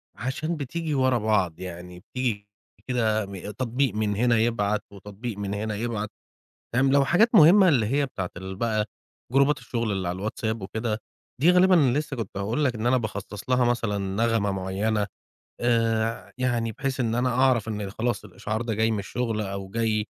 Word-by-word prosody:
عشان 135 +8 -2
بتيجي 155 +3 -3
ورا 130 -2 +3
بعض 105 -7 +1
يعني 90 0 -8
بتيجي 110 -3 -3 0.4
كده 110 -4 +1
م 100 0 -9 0.2
تطبيق 125 +2 0
من 105 -1 0
هنا 120 +2 +3
يبعت 110 -2 +1
وتطبيق 100 +3 -7
من 100 0 -3
هنا 105 +1 -2
يبعت. 110 -1 -3 0.6
فاهم، 135 +3 +3
لو 140 0 +4
حاجات 215 - +4
مُهمّة 185 +4 +8
اللي 125 -9 +3
هي 140 +5 +1
بتاعة 95 -9 -5
ال 95 +1 -6
بقى 110 0 0 0.5
جروبات 140 +2 +4
الشُغل 115 -6 -2
على - - 0
الواتساب 110 +2 -3
وكده، 110 +3 -3 0.4
دي 170 +4 +6
غالبًا 185 +1 +5 0.2
لسه 150 -3 -3
كنت 110 -4 -5
هاقول 110 +9 0
لك 125 -3 +1
إن 110 +2 -1
أنا 130 +1 +4
باخصّص 105 -1 -5
لها 125 -1 +3
مثلًا 115 -4 0
نغمة 100 +2 0
معيّنة 100 +3 -1 0.5
آآ 115 -2 +2 0.2
ع - - -19
يعني 120 -3 0
بحيث 135 +3 -3
إن 115 -2 0
أنا 125 +1 +1
أعرف 125 -3 +3
إن 105 -2 -3
خلاص 120 +1 -2
الإشعار 105 +3 -4
ده 115 -1 -2
جاي 110 +1 +2
من 110 - -1
الشُغل 115 +2 -2
أو 100 -1 -5
جاي 110 0 0
115 Hz, 175 wpm, -26 LUFS, 105-125 Hz, 0.6 s, مُهمّة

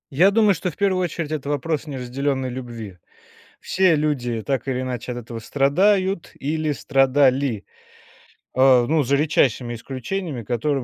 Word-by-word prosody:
Я 175 +8 +5
думаю, 210 -1 +4
что 185 - -3
в - - -11
первую 190 -3 +1
очередь 165 -2 -4
это 150 -3 -4
вопрос 150 +2 -2
неразделенной 130 0 -2
любви. 120 -6 -7 0.6
Все 185 -3 +2
люди 125 -7 -1
так 135 -1 -2
или 130 -1 -1
иначе 125 -1 -4
от 120 - -5
этого 115 -1 -7
страдают 185 - +1
или 155 +2 -1
страдали, 135 -4 +2 0.9
а, 130 -1 +5
ну, 155 +4 +2
за 140 +1 +1
редчайшими 135 -5 +1
исключениями, 130 - -5
которые 125 +5 -1
140 Hz, 145 wpm, -22 LUFS, 125-155 Hz, 0.9 s, Я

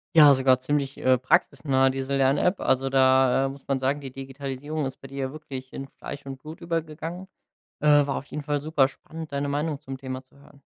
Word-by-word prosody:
Ja, 150 -3 +9
sogar 130 -1 +3
ziemlich, 140 +1 -1
äh, 130 0 +3
praxisnah 135 +1 +2
diese 135 +1 -2
Lern-App. 140 +8 +2
Also 135 0 +1
da, 130 0 +4
äh, - - -1
muss 135 0 -11
man 135 - +1
sagen, 135 +2 0
die 135 -2 -8
Digitalisierung 135 +3 -5
ist 135 - -5
bei 135 - -9
dir 135 +1 -10
ja 135 -1 -2
wirklich 135 -4 -8
in 135 - -6
Fleisch 140 +1 -9
und 135 -1 -6
Blut 155 +1 -10
übergegangen. 165 +2 -4 0.5
Äh, 150 - +2 0.2
war 140 - -1
auf 140 - -5
jeden 150 - -6
Fall 145 0 -1
super 145 -2 +2
spannend, 160 +3 -10
deine 140 0 -1
Meinung 145 +1 -1
zum 135 -2 -7
Thema 130 0 -6
zu 130 - -27
hören. 140 0 -19
135 Hz, 210 wpm, -26 LUFS, 130-150 Hz, 0.5 s, Ja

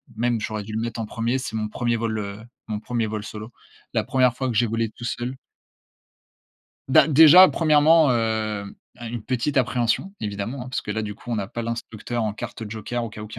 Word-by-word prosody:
même 120 0 0
j'aurais 105 0 -3
dû 110 +1 -8
le 110 - -1
mettre 115 0 -4
en 110 - -2
1er, 115 +3 -1
c'est 125 -4 -5
mon 110 -1 -2
1er 120 +2 -1
vol, 110 -1 -2
heu, 100 0 -6 0.3
mon 105 -1 -3
1er 115 0 -2
vol 105 -1 -4
solo. 110 +2 -8 0.4
La - - +1
1re 125 -2 +2
fois 130 - -2
que 115 - -3
j'ai 120 - +4
volé 115 0 -1
tout 120 - -13
seul. 120 +2 -3 1.5
Ben, 135 - +6
déjà, 160 +5 +9
1°, 155 -1 +4
heu, 110 -3 0 0.4
une 120 -1 -5
petite 130 +4 -2
appréhension, 125 +7 +1
évidemment, 105 +5 -4
hein, 125 - -8
parce 130 - -2
que - - -7
là, 110 +1 -2
du 105 -1 -5
coup, 120 - -11
on 115 - 0
a 100 - -2
pas 120 +3 -5
l'instructeur 115 0 -4
en 105 - -1
carte 115 -1 -7
joker 110 +3 -4
au 115 - -4
cas 105 0 -9
où 105 - -8
qu'il 110 +1 -9
115 Hz, 220 wpm, -23 LUFS, 110-125 Hz, 1.5 s, déjà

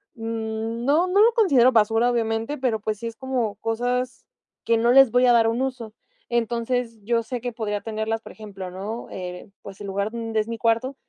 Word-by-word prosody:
No, 225 +7 -1
no 385 +3 +3
lo 460 +1 +5
considero 280 - +5
basura, 225 +1 +3
obviamente, 225 +3 -1
pero, 240 -5 -1
pues, 215 -1 -3
sí 230 - -4
es 230 - -7
como 245 -4 -2
cosas 245 +4 -2 0.4
que 230 - +3
no 235 +1 +3
les 270 -2 +7
voy 250 +2 +4
a 245 - +6
dar 230 -1 +5
un 230 +3 -1
uso. 255 -5 -4 0.4
Entonces, 235 0 -1
yo 230 +2 +1
sé 245 +1 -5
que 245 - -3
podría 210 -3 -3
tenerlas, 220 0 -3
por - - -11
ejemplo, 195 -4 -8
¿no? 205 +5 -6
Eh, 180 +1 -7
pues, 195 0 -11
el 200 - -6
lugar 200 +2 -1
donde 225 -1 -2
es 215 - -1
mi 230 0 -4
cuarto, 230 +4 0
230 Hz, 200 wpm, -24 LUFS, 220-245 Hz, 0.4 s, les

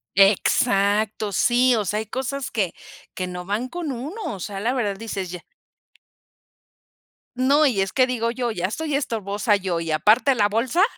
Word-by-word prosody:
Exacto, 205 +1 +3
sí, 245 +5 +3
o 215 -2 -1
sea, 210 +3 -1
hay 220 - -4
cosas 265 +4 -4
que 195 -6 -1 0.4
que 185 - -3
no 180 0 -6
van 215 +6 -2
con 335 -4 -4
uno, 295 - -6
o 190 - -10
sea, 195 +2 -5
la 235 +5 0
verdad 210 -6 -1
dices 195 -4 -5
ya. 180 - -7 1.9
No, 280 +4 +3
y 235 -8 +1
es 195 - -2
que 255 -1 +4
digo 235 -2 -1
yo: 245 -1 -2
"Ya 180 -3 -2
estoy 300 +8 -2
estorbosa 210 -5 0
yo, 185 -4 -2
¿y 165 -1 -3
aparte 220 - +4
la 205 -3 +2
bolsa?". 255 - +1
220 Hz, 175 wpm, -23 LUFS, 195-255 Hz, 1.9 s, que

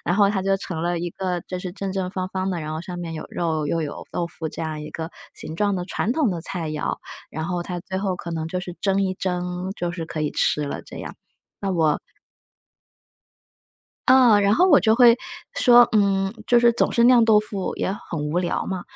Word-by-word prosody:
然 175 - +1
后 200 0 +5
它 195 -2 -1
就 195 0 +2
成 180 -4 -5
了 175 0 0
一 175 +1 -2
个 180 -2 -2
就 185 - -3
是 180 -1 -6
正 195 0 -4
正 190 -1 -2
方 185 -1 -3
方 190 0 -2
的， 175 -2 -2
然 155 0 -4
后 160 - -4
上 175 0 -7
面 170 -2 -5
有 155 - -6
肉 160 -3 -1
又 165 +3 0
有 150 -2 -5
豆 175 - -1
腐， 160 -2 -6
这 - - -8
样 160 -1 -3
一 150 - -8
个 160 0 -5 0.2
形 160 - -8
状 205 +1 +1
的 180 - -2
传 215 +4 -1
统 295 -3 +2
的 175 -4 -3
菜 170 -2 -3
肴。 155 -1 -2 0.3
然 160 +1 -4
后 175 -1 -2
它 175 0 -5
最 190 +2 -6
后 190 -1 -1
可 170 - -7
能 160 -1 -3
就 180 +2 -2
是 180 -1 -7
蒸 195 0 +2
一 190 -1 0
蒸， 180 0 -3
就 175 0 -2
是 170 -1 -5
可 160 -1 -5
以 150 - 0
吃 150 - +1
了 - - -5
这 - - -11
样。 - - -7 0.5
那 195 - -1
我 160 -4 +2 2.1
啊， 255 -5 +6
然 200 +1 +4
后 360 - +4
我 - - +7
就 220 0 +4
会 240 -1 +7 0.4
说， 240 -1 +7
嗯， 195 -2 +2
就 240 - +5
是 235 0 +5
总 - - +1
是 235 - +3
酿 245 -1 +7
豆 220 -2 +6
腐 200 -3 -2
也 - - -1 0.2
很 165 - -3
无 170 - +1
聊 180 -1 -1
嘛， 185 -2 -3
185 Hz, 250 characters per minute, -23 LUFS, 170-200 Hz, 2.1 s, 我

